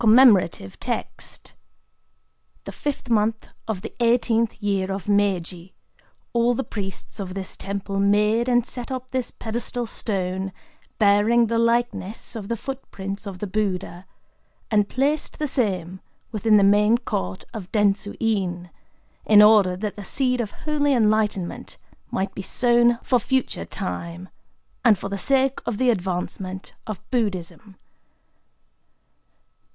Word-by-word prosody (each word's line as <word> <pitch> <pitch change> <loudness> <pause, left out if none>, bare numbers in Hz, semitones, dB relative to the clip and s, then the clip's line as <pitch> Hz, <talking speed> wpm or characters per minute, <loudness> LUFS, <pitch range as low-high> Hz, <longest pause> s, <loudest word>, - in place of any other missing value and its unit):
[Commemorative 215 - +5
Text.] - - -5 1.1
—The - - -7
Fifth 290 -3 -4
Month 220 0 +1 0.2
of 210 -4 -3
the 225 - -6
Eighteenth 230 -2 +2
Year 195 -2 0
of 195 +1 -4
Meiji, 190 -3 0 0.6
all 240 +1 +3
the 270 - -1
priests 200 -1 -6
of 190 -2 -5
this 190 -1 -4
temple 195 0 -4
made 210 +4 +3
and 240 -1 +3
set 245 0 -4
up 255 0 -5
this 255 -2 -1
pedestal 235 +2 -4
stone, 190 -4 -3 0.5
bearing 215 +3 +4
the 230 +1 0
likeness 230 -2 0
of 210 -3 -5
the 235 - -2
footprints 200 -6 -5
of 195 -2 -6
the 210 - -4
Buddha, 190 -3 -3 0.6
and 210 -2 +3
placed 285 +4 0
the 305 - -1
same 190 - -1 0.3
within 215 -1 +4
the 200 - +5
main 210 +3 +5
court 95 - -3
of 195 -5 -7
Dentsu 205 -1 +1
In, 180 -6 -1 0.5
in 210 -1 +6
order 205 -4 +5
that 210 +1 -3
the 205 - -6
seed 250 +4 +1
of 215 - -3
holy 290 +2 0
enlightenment 210 -5 0 0.3
might 195 0 -2
be - - -5
sown 240 +3 +3
for 250 - +3
future 260 +3 -1
time, 180 -2 -5 0.5
and 225 -5 +6
for 195 - -5
the 200 0 -3
sake 270 +4 +2
of 235 - -1
the 255 +1 +4
advancement 185 -1 -4
of 215 -3 -4
Buddhism. 200 -4 -2
210 Hz, 135 wpm, -23 LUFS, 195-235 Hz, 1.1 s, in